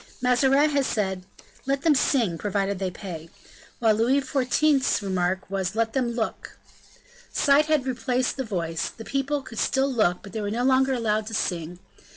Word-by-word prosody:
Mazarin 270 +4 +3
had 280 -1 +2
said: 190 -5 -2 0.4
"Let 275 0 0
them 320 - +5
sing, 235 - +1
provided 200 -1 -1
they 190 -1 -1
pay;" 170 -3 -8 0.5
while 225 -2 +3
Louis 235 +6 +2
XIV.'s 270 -1 +1
remark 185 -1 -1
was, 195 +1 -3
"Let 225 0 0
them 245 -3 0
look." 230 -2 -4 0.7
Sight 290 +1 +3
had 305 -4 +2
replaced 255 0 -1
the 265 - -1
voice; 170 -7 -3
the 225 - -11
people 275 +1 -1
could 225 - -8
still 270 0 +1
look 180 -7 +1
but 200 -2 -11
they 220 - -3
were 205 - -2
no 235 +4 -1
longer 265 +1 +3
allowed 215 -3 0
to 225 - -4
sing. 175 -3 -2
230 Hz, 175 wpm, -25 LUFS, 195-270 Hz, 0.7 s, them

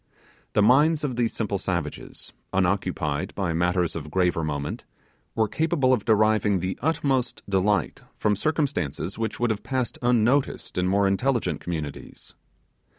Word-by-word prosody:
The 105 - +4
minds 145 +7 +4
of 135 -4 -1
these 120 -1 +1
simple 100 -3 -2
savages, 85 -6 -4 0.2
unoccupied 90 -5 0
by 95 -4 -1
matters 90 +1 +1
of 75 -2 -5
graver 90 -1 +1
moment, 70 -2 -3 0.5
were 110 -1 +2
capable 150 0 +1
of 115 -5 0
deriving 110 -3 +3
the 95 +2 -3
utmost 135 -4 0
delight 100 -1 +1 0.2
from 105 -1 +2
circumstances 105 - -1
which 110 -1 -2
would 120 -1 +2
have 105 - -3
passed 130 -3 -2
unnoticed 125 +3 +1
in 90 0 +1
more 100 +2 +3
intelligent 100 - 0
communities. 80 -5 -6
100 Hz, 140 wpm, -25 LUFS, 90-125 Hz, 0.5 s, The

